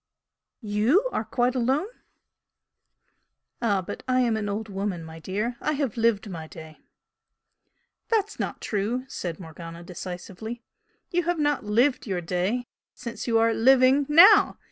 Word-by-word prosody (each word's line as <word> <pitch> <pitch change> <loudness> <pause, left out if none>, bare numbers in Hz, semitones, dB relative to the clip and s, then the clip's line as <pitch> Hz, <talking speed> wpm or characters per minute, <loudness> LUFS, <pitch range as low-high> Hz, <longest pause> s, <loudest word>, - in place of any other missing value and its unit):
"YOU 220 - +2
are - - -1
quite 245 0 0
alone?" 265 +6 +1 1.8
"Ah, 200 -5 +1
but - - -7
I 255 0 +2
am 235 -3 +2
an 210 -1 -2
old 215 +2 -3
woman, 195 -3 -3
my 160 0 -10
dear! 210 +8 -3
I 305 - 0
have 275 -6 -2
lived 225 -2 +1
my 165 -5 -7
day!" 160 -1 -12 1.3
"That's 440 -2 0
not - - -4
true," 225 +5 -2
said 175 -10 -5
Morgana, 165 0 -9
decisively 185 +6 -7 0.5
"You 350 -1 0
have 350 0 0
not 295 -6 0
'lived 240 +6 +2
your 190 -3 -1
day' 180 +8 -1 0.3
since 235 +1 -7
you 230 -1 +3
are 225 0 +3
living 265 +3 +4
NOW! 385 +8 +7
225 Hz, 145 wpm, -25 LUFS, 185-255 Hz, 1.8 s, NOW